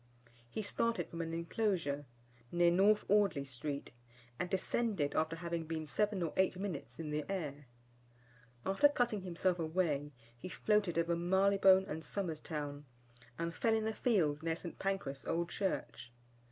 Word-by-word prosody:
He 215 - -3
started 230 +3 0
from 170 - -4
an 165 0 -3
enclosure 165 -4 -1 0.5
near 175 0 +4
North 200 +4 +4
Audley 195 -8 +3
Street, 140 +2 -5 0.5
and 180 - -1
descended 190 -4 0
after 160 +1 +1
having 170 -1 -3
been 160 -1 -3
seven 190 +7 0
or 165 - -2
eight 190 -1 +3
minutes 190 -6 -5
in 155 -2 -4
the 150 0 -1
air. 145 -7 -4 1.0
After 195 +10 +5
cutting 240 -7 0
himself 180 0 0
away, 155 -3 0 0.2
he 120 +10 -8
floated 205 -4 +1
over 170 0 +2
Marylebone 190 +2 +5
and 160 -1 -4
Somers 170 -6 -3
Town, 145 -2 -5 0.5
and 170 0 -2
fell 225 +6 +2
in 220 -1 0
a 220 - 0
field 165 -12 +2
near 165 0 0
St. 170 0 -8
Pancras 150 -10 -2
Old 170 +5 -1
Church. 190 -10 -3
170 Hz, 155 wpm, -35 LUFS, 155-195 Hz, 1.0 s, After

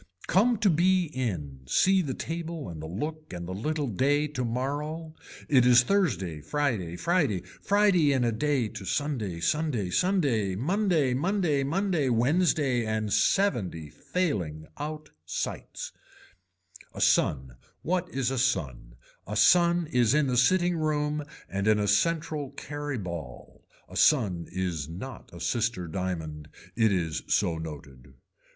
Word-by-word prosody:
Come 225 +6 +3
to 205 - +4
be 175 0 +2
in, 85 - -3
see 190 - +4
the 135 -7 -3
table 165 - -5
and 80 -3 -7
the 80 - -6
look 155 - -5
and 85 -1 -6
the 95 - -4
little 150 +9 -2
day 140 +6 +1
tomorrow, 145 +5 -3 0.3
it 130 -4 +5
is 125 0 +6
Thursday 115 - 0
Friday, 110 - -1
Friday, 145 - +1 0.2
Friday 200 -7 +3
in 130 -3 +2
a 120 - +2
day 130 +1 0
to 100 - -8
Sunday, 110 - -2
Sunday 125 - 0
Sunday, 135 - +1
Monday 165 - +1
Monday 170 0 +1
Monday 165 -1 0
Wednesday 135 0 +2
and 110 -1 -1
seventy 95 - +1
failing 85 - -2
out 155 +1 -6
sights. 85 - -5 1.0
A - - -6
son 65 -3 +2 0.3
what 180 +1 -1
is 130 -1 -1
a 135 - -1
son, 65 - -1 0.3
a 105 - -4
son 175 +6 +5
is 125 0 +3
in 150 -1 +3
the 130 -2 0
sitting 175 +7 +3
room 150 -1 0 0.2
and 100 +2 -2
in 110 -1 +5
a 105 -1 0
central 155 +6 +1
carry 145 0 -5
ball. 85 - -8 0.2
A - - -12
son 100 - +3
is 85 -5 -3
not 115 +11 -8
a - - -10
sister 115 -7 -1
diamond, 80 -4 -4 0.3
it 110 -2 +3
is 80 -4 -1
so 85 -5 +1
noted. 70 -5 -9
130 Hz, 140 wpm, -28 LUFS, -, 1.0 s, is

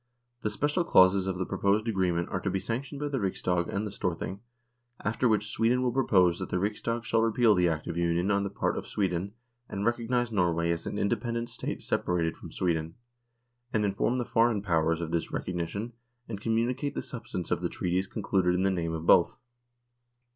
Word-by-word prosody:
The 105 - 0
special 145 - 0
clauses 95 - +5
of 95 -1 -1
the 95 - -1
proposed 105 +5 +1
agreement 90 -5 +1
are 90 - -2
to 95 - -2
be 95 - 0
sanctioned 135 +7 -4
by 145 - -2
the 135 -2 -1
Riksdag 90 -3 0
and 100 +2 -1
the 105 - -4
Storthing, 95 0 -3 0.7
after 115 +4 +1
which 105 -1 +1
Sweden 125 +3 +2
will 125 - +1
propose 95 -9 +3
that 95 - -4
the - - 0
Riksdag 110 +4 -1
shall 115 0 +2
repeal 115 0 +4
the 90 -2 +3
Act 80 -1 -2
of 85 -1 -4
Union 85 +3 +1
on 100 0 +2
the 100 - -2
part 100 - -1
of - - -10
Sweden* 95 0 -1 0.4
and 100 +1 -3
recognise 120 0 0
Norway 85 -4 +1
as 85 0 -3
an - - -3
independent 115 +2 -1
State 120 - -5
separated 85 -2 0
from - - -11
Sweden, 80 -2 -1 0.8
and 105 -1 +1
inform 100 +5 0
the 120 - -1
Foreign 115 -3 +2
Powers 80 -2 +1
of 80 -1 -4
this 85 -1 -1
recognition 90 +6 -3 0.3
and 100 -3 -6
communicate 120 +6 0
the - - -2
sub 125 -5 -8
stance 90 - -4
of - - +1
the - - -1
treaties 90 +2 -1
concluded 95 -4 +1
in 90 - +1
the 95 - +3
name 85 -3 -2
of 80 0 -4
both. - - +5
100 Hz, 200 wpm, -29 LUFS, 90-115 Hz, 0.8 s, clauses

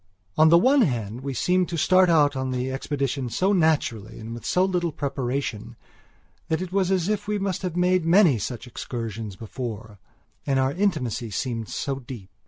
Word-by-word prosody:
On 155 0 +6
the 170 - +7
one 260 +9 +4
hand 120 - -1
we 135 -1 -4
seemed 180 +7 +1
to 170 - -3
start 185 +3 +4
out 145 -4 +4
on 130 0 -2
the 130 +1 -2
expedition 135 -1 -2
so 185 - +1
naturally 145 - 0
and 115 +1 -7
with 120 - -8
so 180 +1 +3
little 180 -3 -1
preparation, 125 -5 -3 0.7
that 160 - 0
it 185 -1 -5
was 195 -2 +2
as 185 -2 +1
if 210 -1 -1
we 210 0 0
must 195 -3 -2
have 180 -3 -3
made 180 0 +2
many 165 - +5
such 120 +3 -5
excursions 115 -4 -6
before; 110 -1 -7 0.4
and 135 -2 0
our 130 0 +2
intimacy 145 - -1
seemed 115 +2 -3
so 135 -1 -3
deep.... 120 -7 -10
140 Hz, 185 wpm, -24 LUFS, 120-180 Hz, 0.7 s, the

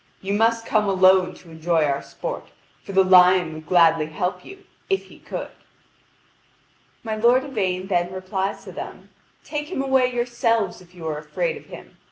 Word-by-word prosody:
You 195 +1 -3
must 225 +2 +2
come 210 -3 +1
alone 185 -1 +4
to 170 - -16
enjoy 160 0 +1
our 140 -1 -1
sport, - - -6 0.4
for - - -8
the 190 0 +5
lion 180 -2 +5
would 155 0 -10
gladly 165 -3 +4
help 180 +4 -3
you, 390 +1 -13 0.2
if 390 0 +1
he - - -17
could." - - -6 1.5
My 220 -2 -3
lord 240 +4 +4
Yvain 190 -8 -2
then 175 -2 0
replies 190 +1 -3
to - - -9
them: - - -9 0.3
"Take 300 -1 -4
him 370 - -3
away 265 -2 +2
yourselves 235 -5 0
if 180 0 -19
you 170 -2 -9
are 150 -1 -3
afraid 475 - -2
of 445 - -12
him. - - -13
190 Hz, 175 wpm, -23 LUFS, 175-240 Hz, 1.5 s, the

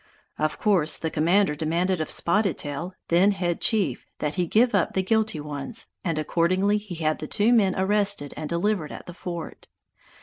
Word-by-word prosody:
Of 155 0 0
course, 185 -8 +2
the 160 - -3
commander 175 +3 +3
demanded 170 +4 0
of 155 - -3
Spotted 195 +1 +1
Tail, 155 +6 -5
then 185 +4 +4
head 175 -3 -2
chief, 190 - +1
that 150 0 -2
he 180 -2 -1
give 235 +6 +3
up 200 -4 +1
the 190 - +1
guilty 220 -4 +1
ones, 150 - -4 0.2
and 165 -4 -1
accordingly 185 +6 +1
he 205 -4 -8
had 155 -1 -1
the 155 - -5
two 220 +7 +2
men 195 -5 +3
arrested 200 -5 +1
and 155 - -5
delivered 170 -2 0
at - - -9
the 175 - -9
fort. 170 -2 -7
180 Hz, 180 wpm, -25 LUFS, 155-205 Hz, 0.2 s, then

